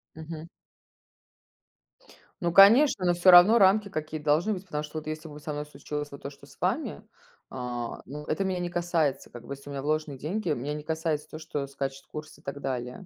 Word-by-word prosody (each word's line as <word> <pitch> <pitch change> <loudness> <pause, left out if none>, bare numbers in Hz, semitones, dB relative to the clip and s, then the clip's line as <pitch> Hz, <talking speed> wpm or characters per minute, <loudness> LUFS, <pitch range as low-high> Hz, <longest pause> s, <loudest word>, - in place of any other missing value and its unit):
Мгм. 160 0 -8 1.9
Ну, 170 - +1
конечно, 200 - +7
но 175 - +4
всё 175 +2 +6
равно 180 +6 +9
рамки 200 0 +4
какие-то 155 -3 -5
должны 160 +8 +3
быть, 190 0 -7
потому 150 -5 -3
что 150 +1 -7
вот 155 - -13
если 155 +1 -5
бы 150 0 -10
со 150 - -6
мной 145 0 -4
случилось 150 0 -6
вот 140 - -10
то, - - -4
что 140 - -16
с - - -18
вами, - - -1 0.5
а, 125 -2 -5
ну, 150 +3 -8
это 155 +6 -1
меня 190 -2 -1
не 175 0 -2
касается, 170 -5 0
как 120 -1 -11
бы - - -5
если 140 +1 -11
у - - -6
меня 135 - -4
вложены 150 -1 -1
деньги, 175 +8 -3
меня 145 +1 -2
не 150 0 -6
касается 160 -1 -2
то, 155 - -8
что 150 -3 -4
скачет 135 0 -5
курс, 155 0 -8
и - - -21
так 140 +1 -6
далее. 125 +5 -4
155 Hz, 210 wpm, -28 LUFS, 140-175 Hz, 1.9 s, равно